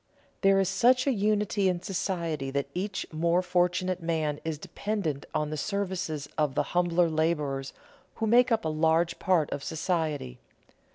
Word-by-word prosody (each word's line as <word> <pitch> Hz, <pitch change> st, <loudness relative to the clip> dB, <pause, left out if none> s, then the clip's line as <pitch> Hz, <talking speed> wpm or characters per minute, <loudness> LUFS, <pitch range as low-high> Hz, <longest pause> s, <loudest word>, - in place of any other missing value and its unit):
There 195 Hz, -1 st, +5 dB
is 195 Hz, -, +2 dB
such 250 Hz, +6 st, +3 dB
a 275 Hz, -, +3 dB
unity 210 Hz, -2 st, +1 dB
in 180 Hz, -1 st, -2 dB
society 170 Hz, -7 st, -2 dB
that 140 Hz, 0 st, -2 dB
each 195 Hz, +2 st, -3 dB
more 170 Hz, +3 st, +2 dB
fortunate 180 Hz, 0 st, +1 dB
man 160 Hz, -3 st, -1 dB
is 160 Hz, -2 st, -3 dB
dependent 175 Hz, -3 st, -3 dB
on 150 Hz, 0 st, -1 dB
the 155 Hz, -, -3 dB
services 185 Hz, -5 st, -2 dB
of 150 Hz, -3 st, +1 dB
the -, -, +2 dB
humbler 175 Hz, -1 st, +3 dB
laborers 150 Hz, -4 st, -1 dB, 0.4 s
who 225 Hz, -, -2 dB
make 240 Hz, +3 st, +4 dB
up 225 Hz, -1 st, +1 dB
a -, -, +1 dB
large 160 Hz, +2 st, +1 dB
part 175 Hz, -5 st, +2 dB
of 140 Hz, -, -4 dB
society. 160 Hz, -, -2 dB
170 Hz, 160 wpm, -28 LUFS, 155-195 Hz, 0.4 s, There